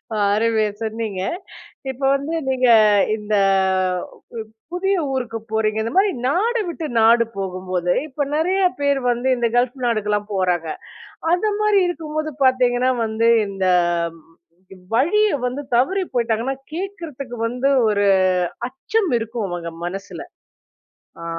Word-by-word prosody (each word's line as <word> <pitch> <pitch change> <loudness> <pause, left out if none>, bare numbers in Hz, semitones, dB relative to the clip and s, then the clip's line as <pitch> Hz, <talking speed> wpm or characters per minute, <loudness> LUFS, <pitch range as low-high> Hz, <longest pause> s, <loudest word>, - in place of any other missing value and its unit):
அ - - -2 0.2
அருமையா 220 0 +2
சொன்னீங்க. 220 -3 -3 0.7
இப்ப 265 +1 -9
வந்து 285 +4 -4 0.2
நீங்க 255 -1 +2 0.5
இந்த 210 0 -3 1.2
பு 225 +10 -12
புதிய 385 +2 +1 0.2
ஊருக்கு 240 -3 -3
போறீங்க. 220 0 0
இந்த 230 - -3
மாதிரி 395 +1 +4 0.2
நாடு 440 - +1
விட்டு 335 -1 -5
நாடு 230 +1 +5
போகும்போதுm 185 -2 -1
இப்ப 290 0 -6
நிறைய 365 +5 +1 0.2
பேர் 280 -1 +2
வந்து 240 +2 -2
இந்த 240 -1 +1
கல்ஃப் 245 +2 +1
நாடுக்கெல்லாம் 210 -2 0
போறாங்க. 180 -4 0 0.6
அந்த 360 +5 +2
மாரி 425 -1 +3
இருக்கும்போது 310 -2 -3
பார்த்தீங்கன்னா 255 -1 +3
வந்து, 225 +1 +1 0.2
இந்த 195 -1 -3 1.3
வழிய 420 - +3 0.2
வந்து 255 +3 -4
தவறி 370 +11 +2
போய்ட்டாங்கன்னா, 235 +2 0 0.2
கேட்கிறதுக்கு 325 -9 -6
வந்து 250 +4 0 0.2
1 205 -1 +1 0.6
அச்சம் 360 - -1
இருக்கும் 225 -1 -4
அவுங்க 170 -1 -5
மனசில. 195 +2 -6 1.0
ஆ. - - -6
245 Hz, 120 wpm, -21 LUFS, 215-310 Hz, 1.3 s, நாடு